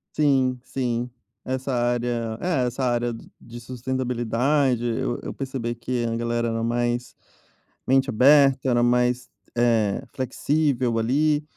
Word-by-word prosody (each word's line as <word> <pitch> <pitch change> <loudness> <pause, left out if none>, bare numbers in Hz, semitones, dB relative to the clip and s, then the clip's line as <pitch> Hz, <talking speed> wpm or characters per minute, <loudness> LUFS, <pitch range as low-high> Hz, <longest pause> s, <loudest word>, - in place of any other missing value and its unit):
Sim, 130 -4 +2
sim, 125 -2 -2 0.3
essa 130 +1 -3
área 120 -2 -1
é, 145 -9 0
essa 130 +2 -3
área 120 -1 +1
de 115 - -10
de 120 +1 -10
sustentabilidade, 125 +1 0
eu 120 +1 -1
eu - - -5
percebi 130 -3 -4
que 120 0 -3
a 115 0 -1
galera 120 0 -1
era 115 0 -2
mais, 120 +1 -1 0.7
mente 135 +1 +3
aberta, 135 +2 +5
era 120 -1 +3
mais, 125 +1 +2 0.3
eh, 115 -2 +2
flexível 130 -2 0
ali, 145 +6 +2
125 Hz, 130 wpm, -24 LUFS, 120-130 Hz, 0.7 s, aberta